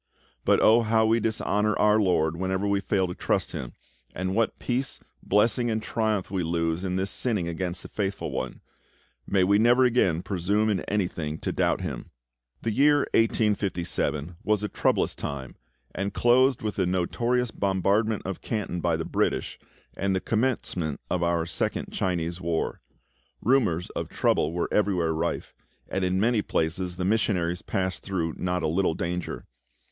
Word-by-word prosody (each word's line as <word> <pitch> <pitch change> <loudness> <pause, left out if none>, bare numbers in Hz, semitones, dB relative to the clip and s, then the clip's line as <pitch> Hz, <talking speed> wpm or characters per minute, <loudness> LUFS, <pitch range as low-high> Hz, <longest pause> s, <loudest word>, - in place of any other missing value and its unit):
But - - +4
oh, 115 +2 +6
how 110 0 +3
we 115 +1 +3
dishonour 110 -1 0
our 105 0 +4
LORD 85 -5 +2
whenever 95 +3 -1
we 100 0 +2
fail 95 0 +1
to 90 - -4
trust - - -1
Him, 60 -2 -6 0.4
and 95 +1 -2
what 115 +2 +1
peace, 130 +2 -2 0.2
blessing, 115 +4 +2
and 110 -1 0
triumph 110 -3 -1
we 95 -2 0
lose 85 +1 -1
in 90 -1 -1
thus 95 +1 -1
sinning 105 -9 0
against 90 +1 -3
the - - -8
Faithful 100 -1 -3
One! - - -4 0.7
May 95 -2 +3
we 100 +2 +4
never 120 +3 +5
again 95 -9 +2
presume 100 +3 +1
in 100 - +1
anything 85 -6 -2
to - - -1
doubt - - +1
Him! - - -5 0.5
The 115 - 0
year 145 +5 +4
1857 95 -7 0
was 105 -1 +1
a - - 0
troublous - - +1
time, 65 -3 -6 0.4
and 100 +2 -2
closed 125 +1 +4
with 105 -1 -3
the 95 -2 +1
notorious 115 +7 0
bombardment 100 +2 +1
of 95 -1 -4
Canton 105 -5 -3
by 85 -1 +1
the 80 - -3
British, - - -1 0.4
and 95 0 0
the - - +1
commencement 110 - -1
of 90 - +1
our 85 -1 +1
second 85 - -2
Chinese 85 -1 -1
war. 85 -1 -2 0.6
Rumours 110 -9 +1
of - - -4
trouble 75 - +1
were 85 +1 -1
everywhere 90 -6 +2
rife, 80 +2 -2 0.3
and 95 - -2
in 90 +1 +1
many 115 +1 +3
places 90 +1 -1
the 90 0 -2
missionaries 90 -4 +1
passed 95 -1 -2
through 85 -5 -2
not 90 -1 -1
a - - +2
little 85 +1 +1
danger. 90 +1 -4
95 Hz, 165 wpm, -26 LUFS, 85-110 Hz, 0.7 s, oh